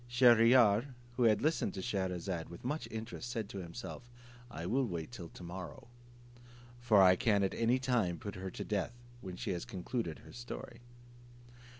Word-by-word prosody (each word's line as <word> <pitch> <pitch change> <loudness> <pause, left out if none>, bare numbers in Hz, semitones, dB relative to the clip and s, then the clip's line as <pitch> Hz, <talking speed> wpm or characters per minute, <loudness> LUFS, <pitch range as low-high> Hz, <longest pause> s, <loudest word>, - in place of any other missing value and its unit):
Shier 120 -1 +6
ear, 120 +1 +5 0.2
who 120 0 +3
had 110 0 +4
listened 155 -6 +1
to 95 - -4
Scheherazade 90 -3 -2
with 85 +6 -11
much 150 +5 -2
interest, 115 +2 -6
said 115 -4 -3
to 100 - -6
himself, 120 +7 -7 0.4
"I - - -6
will 130 +2 +1
wait 85 0 -4
till 90 -9 -8
to - - -12
morrow, 90 +3 -8 0.9
for 110 -5 +5
I 90 0 +7
can 100 +1 +2
at 95 - 0
any 115 +2 +2
time 120 -9 +1
put 100 +4 -6
her 95 0 -5
to - - -6
death 105 +2 -1 0.3
when 95 -2 -6
she - - -3
has 90 -2 -2
concluded 110 -4 -3
her - - -12
story." - - -8
105 Hz, 180 wpm, -34 LUFS, 90-120 Hz, 0.9 s, I